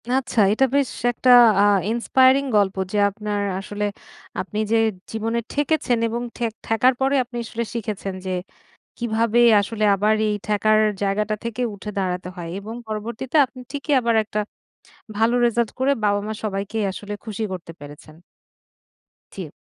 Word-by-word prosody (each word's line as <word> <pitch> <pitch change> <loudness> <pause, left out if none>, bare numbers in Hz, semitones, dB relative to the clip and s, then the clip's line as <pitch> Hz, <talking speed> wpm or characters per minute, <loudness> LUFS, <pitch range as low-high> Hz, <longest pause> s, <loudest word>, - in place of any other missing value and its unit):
আচ্ছা, 255 -2 0
এটা 265 +5 +3
বেশ 280 -3 +2 0.2
একটা 250 +2 0 0.3
আ - - +5 0.3
inspiring 260 +3 +3
গল্প 200 -2 +2 0.2
যে 210 - -1
আপনার 205 0 -4 0.2
আসলে 205 +1 -4 0.6
আপনি 210 +3 -5
যে 230 - +4 0.3
জীবনে 225 +1 -1
ঠেকেছেন 290 -4 +1
এবং 235 +1 -3 0.2
ঠে 240 - -1 0.2
ঠেকার 250 +3 +3
পরে 270 +1 +2
আপনি 240 0 -9
আসলে 230 +1 -4
শিখেছেন, 210 -4 -4
যে 185 - -2 0.7
কিভাবে 230 0 +1 0.2
আসলে 215 +1 -2
আবার 210 +2 +2
এই 210 - 0
ঠেকার 215 +1 +3 0.2
জায়গাটা 210 +2 0
থেকে 235 +1 -3
উঠে 205 +1 -7
দাঁড়াতে 180 -1 -2
হয় 170 -2 -6
এবং 215 +3 -7
পরবর্তীতে 220 +6 -4
আপনি 255 0 -13
ঠিকই 290 +1 -3
আবার 235 -1 +1
একটা 215 0 -4 0.8
ভালো 225 +3 +2
রেজাল্ট 235 -1 +1
করে 265 +2 +2
বাবা-মা 205 +1 0
সবাইকেই 205 +1 -2
আসলে 205 +2 -8
খুশি 220 0 -5
করতে 175 -2 -7
পেরেছেন। 145 +1 -12 1.2
জি। - - -7
220 Hz, 145 wpm, -22 LUFS, 205-240 Hz, 1.2 s, আ